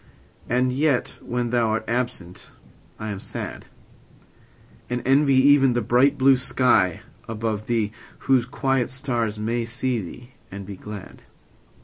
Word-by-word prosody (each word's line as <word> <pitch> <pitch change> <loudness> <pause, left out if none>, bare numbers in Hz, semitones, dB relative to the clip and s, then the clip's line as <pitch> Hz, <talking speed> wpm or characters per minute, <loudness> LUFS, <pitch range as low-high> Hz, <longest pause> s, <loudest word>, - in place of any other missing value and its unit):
And 125 +2 +2
yet 140 0 +1
when 120 -1 -2
thou 120 -2 +2
art 110 - -2
absent 120 -7 -3 0.5
I 110 - -5
am 100 -2 -4
sad; - - -3 1.2
And 125 0 -2
envy 135 0 +4
even 135 -1 +5
the 120 -1 0
bright 125 +6 +3
blue 135 0 +5
sky 110 -8 +2 0.3
above 110 -1 -3
thee, 110 -3 0 0.3
Whose 130 -3 +2
quiet 135 -1 0
stars 120 -5 -2
may 115 +3 -1
see 120 0 -1
thee 120 +7 -10 0.2
and 100 0 -7
be 100 0 -7
glad. 105 +1 -10
120 Hz, 135 wpm, -23 LUFS, 110-130 Hz, 1.2 s, even